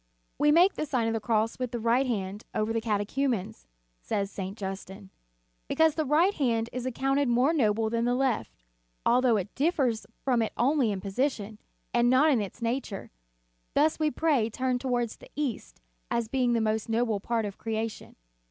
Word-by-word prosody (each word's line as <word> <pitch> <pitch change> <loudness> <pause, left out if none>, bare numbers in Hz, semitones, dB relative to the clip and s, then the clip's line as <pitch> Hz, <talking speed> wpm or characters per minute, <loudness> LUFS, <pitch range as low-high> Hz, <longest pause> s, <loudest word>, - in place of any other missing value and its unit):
"We 295 0 +5
make 355 +5 +5
the 305 - -3
Sign 255 -5 0
of 225 - 0
the 225 - 0
Cross 220 +1 0
with 255 -1 -2
the 240 0 -4
right 235 +4 +2
hand 205 -3 -3
over 215 +1 0
the 230 - 0
catechumens," 215 - -1 0.3
says 200 - -2
St. 195 +1 -5
Justin, 195 0 -7 0.6
"because 320 -1 +3
the 315 -2 -1
right 330 +8 +4
hand 235 - 0
is 250 +1 -3
accounted 270 +2 +1
more 250 +6 +3
noble 220 -6 +2
than 230 0 0
the 245 0 +2
left, 260 -4 0 0.5
although 245 -2 +4
it 195 0 -4
differs 270 -7 0 0.2
from 250 -3 +2
it 220 - -2
only 260 -2 +2
in 195 -2 -3
position, 215 0 -2 0.3
and 240 0 +4
not 275 +5 +5
in 245 -6 +2
its 205 +4 -6
nature; 230 -4 -3 0.6
thus" 305 +2 +3
we 310 -1 +2
pray 275 -6 +1
turned 255 +1 -1
toward 245 -3 0
the - - -13
east, 275 - -4 0.3
as 235 -1 0
being 250 0 +1
the 230 - +2
most 220 0 -1
noble 225 -2 +1
part 225 +2 -1
of 200 -1 -7
creation. 225 0 -4
235 Hz, 180 wpm, -28 LUFS, 215-265 Hz, 0.6 s, We